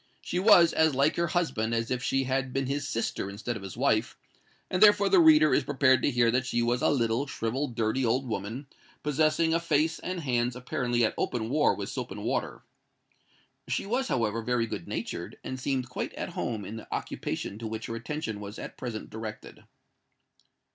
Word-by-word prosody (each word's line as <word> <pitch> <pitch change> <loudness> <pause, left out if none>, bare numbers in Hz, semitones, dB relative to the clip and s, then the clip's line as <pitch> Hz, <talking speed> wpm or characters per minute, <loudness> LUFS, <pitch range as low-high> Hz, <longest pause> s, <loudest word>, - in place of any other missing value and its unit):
She 175 - -3
was 180 -4 +6
as 160 -3 +3
like 140 +3 +3
her 170 0 +1
husband 135 - 0
as 115 +1 -2
if 125 -1 0
she 135 +1 +1
had 130 0 -1
been 135 0 0
his 140 +2 -2
sister 115 -3 -2
instead 110 +4 -4
of 110 - -6
his 95 +2 -8
wife; 115 -4 +1 0.5
and 185 - -2
therefore 205 -1 +6
the 190 -1 +6
reader 155 -2 +6
is 145 - +3
prepared 130 -2 +3
to - - +2
hear 120 -3 +3
that 125 +1 0
she 120 -1 0
was 120 +2 +1
a - - +3
little, 120 0 +1
shrivelled, 125 +2 -3
dirty 115 +3 0
old 125 +3 +1
woman, 110 +5 -4 0.4
possessing 155 +2 +2
a 165 - +3
face 160 -1 +1
and 180 -1 -4
hands 125 -3 0
apparently 125 -1 0
at - - -1
open 115 -1 -2
war 150 +1 +3
with - - -5
soap - - -4
and - - -7
water. - - -2 1.0
She - - -1
was, 250 +6 0
however, 115 -2 0
very 120 0 0
good 110 - -6
natured, - - -5
and 130 - -5
seemed 130 -1 -1
quite 125 - -4
at - - -4
home 110 -4 -3
in 110 +4 -6
the 110 - -10
occupation 100 - -4
to 115 - -4
which 110 0 -5
her 115 - -4
attention 115 -2 -4
was 105 +1 -8
at - - -8
present 115 -4 -5
directed. 110 -1 -8
125 Hz, 200 wpm, -28 LUFS, 115-150 Hz, 1.0 s, was